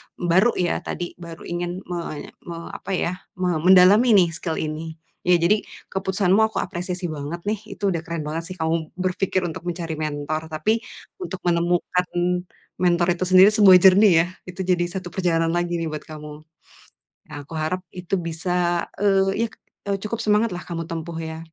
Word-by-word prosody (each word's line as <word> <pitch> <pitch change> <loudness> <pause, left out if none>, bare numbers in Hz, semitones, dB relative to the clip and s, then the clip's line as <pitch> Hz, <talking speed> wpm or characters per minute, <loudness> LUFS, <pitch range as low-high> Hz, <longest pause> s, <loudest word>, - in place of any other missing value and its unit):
baru 180 +7 +3
ya 175 -1 0
tadi, 175 -1 -5
baru 170 -1 -9
ingin 175 +2 -4
menye 170 -4 -5 0.2
me 170 -1 -5
apa - - -7
ya, 180 0 -2 0.2
me 180 -3 +1
mendalami 190 +6 +7
nih 180 -4 +5
skill 165 -1 -3
ini. 160 +1 -4 0.3
Ya, 180 - +6
jadi 175 +5 +3 0.3
keputusanmu 190 0 +1
aku 220 - -8
apresiasi 180 0 -5
banget 155 +3 -6
nih. 210 0 -1 0.2
Itu 200 -2 0
udah 170 - -1
keren 165 -1 -5
banget 155 +3 -4
sih 185 - -6
kamu 160 -1 -1
berpikir 185 0 -1
untuk 170 -2 -4
mencari 170 -2 -3
mentor, 155 +1 -3
tapi 160 +9 0 0.4
untuk 190 - -6
menemukan 175 +1 +1 0.7
mentor 175 -1 +3
itu 180 +1 -2
sendiri 185 +3 +7
sebuah 205 -4 +8
journey 190 -3 +7
ya, - - -5 0.2
itu 180 +1 -5
jadi 180 -1 +1 0.2
satu 180 -1 -9
perjalanan 165 -2 +1
lagi 175 0 -1
nih 165 -2 -3
buat 155 - -5
kamu. 150 -1 -8 1.0
Nah, - - -9
aku 145 - -16
harap 160 +4 -2
itu 180 +1 -4
bisa, 175 0 -1 0.2
eee, 195 +2 +2
yak, 220 - -15 0.4
eee, 195 - 0
cukup 225 +2 -3
semangatlah 210 -4 +1
kamu 165 -1 -5
tempuh 165 0 -5
ya. 160 -1 -5
175 Hz, 170 wpm, -23 LUFS, 165-190 Hz, 1.0 s, sebuah